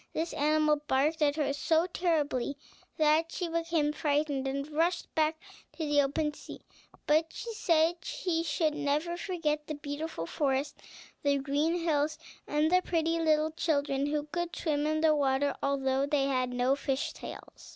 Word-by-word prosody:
This 330 +1 -2
animal 305 +1 +3
barked 295 +5 +1
at 290 -1 +3
her 285 -3 0
so 320 +3 +2
terribly 300 -7 -1 0.4
that 315 +1 +3
she 355 - -3
became 330 -2 0
frightened, 290 -2 0
and 275 +1 -2
rushed 335 +4 0
back 315 0 +1 0.3
to 320 - -4
the 290 -1 +4
open 295 +2 0
sea. - - -11 0.4
But 310 +2 +3
she 465 - -6
said 335 -4 +2
she 330 -2 -2
should 315 -1 0
never 300 +3 -1
forget 320 -5 -2
the 305 - -3
beautiful 290 - -5
forest, 275 - -1 0.4
the 285 -1 +2
green 290 +5 0
hills, 305 -2 +1 0.3
and 300 +2 +1
the 365 0 +5
pretty 330 -1 0
little 315 -1 +2
children 285 -3 0
who 295 0 -1
could 345 +3 -4
swim 300 -2 0
in 310 0 0
the 320 -1 +5
water, 280 0 +1
although 270 0 +1
they 285 -2 +2
had 255 -2 0
not 250 +3 +1
fish's 270 -1 -1
tails. - - -10
300 Hz, 160 wpm, -30 LUFS, 285-325 Hz, 0.4 s, the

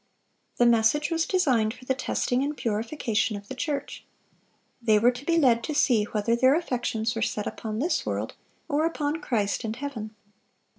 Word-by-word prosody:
The 240 - +4
message 235 +8 +3
was 330 0 0
designed 255 - +2
for 255 - -15
the 265 - +1
testing 255 -1 -1
and 290 +1 -3
purification 225 -1 -1
of 200 0 -12
the - - -6
church. 280 +2 -4 0.8
They 220 -2 +4
were 235 +4 +5
to 250 +2 -9
be 335 +2 +1
led 240 -7 +4
to 305 - -3
see 240 -8 +3
whether 215 +2 0
their 260 +4 +4
affections 240 -8 -1
were 225 - -3
set 210 -1 -1
upon 215 -1 -5
this 315 +10 0
world - - -3 0.3
or 300 0 +1
upon 310 -1 -2
Christ 210 -4 -1
and 220 0 -3
heaven. 230 -5 -6
245 Hz, 180 wpm, -26 LUFS, 220-290 Hz, 0.8 s, were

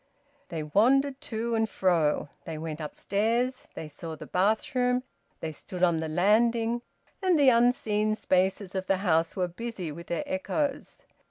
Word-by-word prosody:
They 160 -2 -3
wandered 265 - +3
to 230 +1 -3
and 225 -1 +1
fro. 165 -7 +1 0.2
They 160 -1 -5
went 155 0 -5
upstairs. 225 - -1
They 160 - -6
saw 160 +2 -7
the - - -9
bathroom. 250 +6 +1 0.4
They 160 - -3
stood 180 +4 -6
on 170 -2 +4
the 160 0 -3
landing, 225 +7 +2 0.4
and 370 -3 +3
the 280 -3 +6
unseen 230 -3 +2
spaces 190 -1 +1
of 190 -1 -3
the 195 - +3
house 165 -1 +2
were 185 -2 0
busy 185 -2 -5
with 170 +3 -9
their 170 - -2
echoes. 280 0 -2
205 Hz, 155 wpm, -28 LUFS, 170-240 Hz, 0.4 s, the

